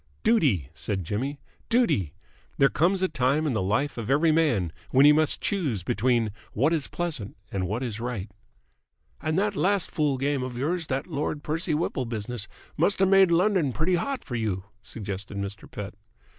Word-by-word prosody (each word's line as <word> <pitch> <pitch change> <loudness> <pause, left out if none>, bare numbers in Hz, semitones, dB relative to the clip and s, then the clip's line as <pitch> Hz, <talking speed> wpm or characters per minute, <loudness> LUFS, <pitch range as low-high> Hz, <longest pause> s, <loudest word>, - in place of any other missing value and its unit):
"Duty!" 135 - +2
said 95 +2 -3
Jimmy. 130 - -3 0.3
"Duty! 105 - +2 0.4
There 135 - +5
comes 185 +4 +2
a - - +4
time 150 0 +1
in 145 - 0
the 110 - 0
life 110 +8 0
of 110 - -5
every 155 +4 +4
man 120 - +2 0.2
when 135 +2 +5
he 150 - +9
must 155 0 +2
choose 145 - -1
between 115 +3 +1 0.2
what 145 +9 +2
is 155 -4 0
pleasant 150 -15 -3
and 95 -2 -1
what 110 +7 -2
is 110 -4 -4
right." 115 -5 -3 0.9
"And 155 +1 -1
that 205 +1 +1
last 195 0 +1
fool 150 -4 +1
game 140 +1 0
of 125 -1 -5
yours, 160 +5 -1
that 135 0 -1
Lord 145 +1 -3
Percy 155 0 -1
Whipple 150 -4 -1
business, 115 0 -4 0.3
must 175 +6 +3
have 190 0 +3
made 195 -1 +6
London 170 - +2
pretty 160 +7 +1
hot 260 +10 -1
for 130 -4 -5
you?" 105 -5 -1 0.2
suggested 100 -3 -6
Mr. 100 +1 -5
Pett. 100 -2 -6
135 Hz, 180 wpm, -26 LUFS, 110-165 Hz, 0.9 s, he